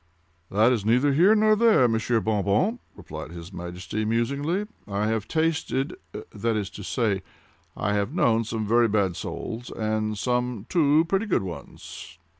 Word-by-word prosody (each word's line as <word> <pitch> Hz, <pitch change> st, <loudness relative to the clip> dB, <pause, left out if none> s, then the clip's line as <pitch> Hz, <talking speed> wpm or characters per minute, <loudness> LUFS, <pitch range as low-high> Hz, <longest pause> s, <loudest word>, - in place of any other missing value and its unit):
"That 110 Hz, +5 st, +4 dB
is 115 Hz, -5 st, 0 dB
neither 125 Hz, +6 st, +3 dB
here 185 Hz, +9 st, +5 dB
nor 215 Hz, 0 st, +4 dB
there, 215 Hz, -, +5 dB
Monsieur 115 Hz, +1 st, +1 dB
Bon 105 Hz, -2 st, 0 dB
Bon," 185 Hz, -, +1 dB, 0.2 s
replied -, -, -8 dB
his 85 Hz, +2 st, -10 dB
Majesty, 90 Hz, +4 st, -5 dB
musingly. 140 Hz, -, 0 dB, 0.2 s
"I 100 Hz, +1 st, -1 dB
have 110 Hz, -1 st, -1 dB
tasted—that 135 Hz, -7 st, -2 dB
is 100 Hz, -2 st, -3 dB
to 105 Hz, -, -9 dB
say, 105 Hz, -2 st, 0 dB, 0.6 s
I 105 Hz, -, 0 dB
have 100 Hz, -1 st, 0 dB
known 115 Hz, -1 st, +2 dB
some 110 Hz, -1 st, -3 dB
very 115 Hz, +2 st, +4 dB
bad 100 Hz, -4 st, +1 dB
souls, 120 Hz, +7 st, -6 dB
and 110 Hz, -1 st, -2 dB
some 125 Hz, -2 st, -1 dB
too—pretty 165 Hz, +6 st, +2 dB
good 185 Hz, -, +1 dB
ones." 85 Hz, -2 st, -9 dB
115 Hz, 150 wpm, -25 LUFS, 105-140 Hz, 0.6 s, here